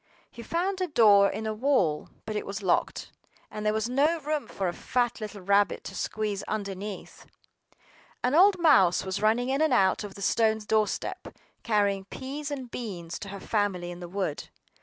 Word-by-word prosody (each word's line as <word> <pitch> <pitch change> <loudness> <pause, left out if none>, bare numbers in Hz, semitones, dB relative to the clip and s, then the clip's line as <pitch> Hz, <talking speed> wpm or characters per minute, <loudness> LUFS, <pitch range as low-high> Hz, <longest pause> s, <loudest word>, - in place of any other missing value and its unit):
HE 235 - -10
found 365 - -2
a 365 - +1
door 205 - +6
in 220 +3 -5
a 220 - -1
wall; 215 - +1 0.2
but 215 - -4
it 210 - -1
was 200 +1 -6
locked, 180 - 0 0.4
and 210 0 -6
there 210 - +2
was 220 +1 -1
no 290 +7 +2
room 300 0 -2
for 195 - -3
a 175 - -2
fat 240 +2 -1
little 210 -2 -6
rabbit 200 +2 +2
to - - -8
squeeze 210 -2 -2
underneath. 200 -1 -6 1.0
An 250 +2 +1
old 375 +4 +6
mouse 265 - +4
was 190 +1 -3
running 230 +4 +2
in 270 +3 +1
and 315 -4 +3
out 190 -2 +3
over 205 -2 -8
the 200 - -7
stone 220 0 +2
doorstep, 215 0 -1 0.3
carrying 200 -3 +1
peas 280 +7 -6
and 265 -4 -6
beans 175 -8 -6
to 200 - -7
her 200 0 -7
family 190 -5 -1
in 175 - -9
the 175 -1 -8
wood. 185 -5 -3
215 Hz, 185 wpm, -27 LUFS, 195-255 Hz, 1.0 s, door